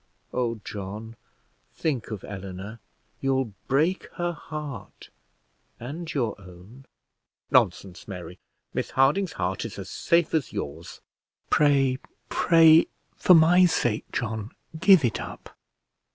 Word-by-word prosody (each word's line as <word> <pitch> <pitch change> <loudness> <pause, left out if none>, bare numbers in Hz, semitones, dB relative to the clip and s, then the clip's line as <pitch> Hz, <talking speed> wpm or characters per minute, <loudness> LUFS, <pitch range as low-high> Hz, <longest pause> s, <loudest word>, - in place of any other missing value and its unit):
Oh, 115 -3 -1
John, 105 +3 -7 0.6
think 140 -8 -2
of 110 -4 -6
Eleanor. 100 +3 -8 0.4
You'll 130 -5 0
break 155 +8 +1
her 175 0 -1
heart, 150 - -8 0.7
and 155 +7 -6
your 120 -8 -1
own." 95 +8 -14 0.7
"Nonsense, 95 -2 +1
Mary; 90 -2 -8 0.3
Miss - - -2
Harding's 145 +7 +2
heart 95 +1 -2
is - - -7
as - - -7
safe 170 -1 +1
as 155 -8 0
yours." 95 -9 -6 0.5
"Pray, 135 -3 +3 0.3
pray, 165 -1 +6 0.3
for 180 - +6
my 175 +3 +6
sake, 120 -9 0
John, 110 -4 -3 0.3
give 185 -5 +6
it 115 - -1
up. - - -10
130 Hz, 115 wpm, -26 LUFS, 105-160 Hz, 0.7 s, pray